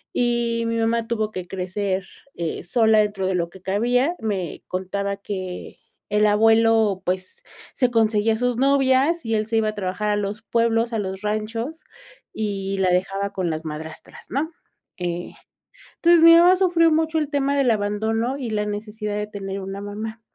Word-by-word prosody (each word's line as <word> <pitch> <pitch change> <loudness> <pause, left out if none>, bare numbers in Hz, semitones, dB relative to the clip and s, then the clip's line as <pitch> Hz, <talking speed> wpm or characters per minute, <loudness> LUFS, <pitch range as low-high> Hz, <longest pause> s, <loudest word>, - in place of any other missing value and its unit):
Y 235 -1 +1
mi 230 0 -1
mamá 230 0 0
tuvo 220 -2 -1
que 185 -3 -6
crecer, 190 +1 -2 0.3
eh, 170 -2 -4
sola 220 +3 +3
dentro 205 -2 0
de 190 - 0
lo 170 -1 -1
que 190 - -14
cabía. 245 - +1
Me 200 - -3
contaba 200 +2 -3
que 185 -3 -6 0.3
el 210 0 +4
abuelo, 225 -1 +4
pues, 185 +1 -3 0.3
se 250 -2 +2
conseguía 220 -1 +2
a - - -2
sus 245 0 0
novias 275 +4 +3
y 225 - -1
él 215 0 -1
se 225 0 0
iba 220 -1 +2
a 215 - -4
trabajar 205 +1 -2
a - - +2
los 205 +2 -3
pueblos, 230 0 +1
a 220 - 0
los 190 0 -4
ranchos, 225 +8 -3 0.5
y 195 -2 -3
la 185 -1 +2
dejaba 195 +2 0
con 180 -3 -1
las 160 0 -4
madrastras, 160 +1 -8
¿no? 300 +5 -2 0.5
Eh, 175 0 -3 0.6
entonces, 340 -1 +5
mi 335 0 +10
mamá 355 +2 +7
sufrió 350 -3 +3
mucho 320 0 +1
el 300 -2 0
tema 280 -1 0
del 275 -3 +3
abandono 220 +4 -1
y 245 -5 -4
la 210 -1 0
necesidad 210 0 -4
de 210 0 -3
tener 195 -1 -5
una 195 +1 -6
mamá, 220 +2 -6
215 Hz, 175 wpm, -23 LUFS, 195-235 Hz, 0.6 s, mi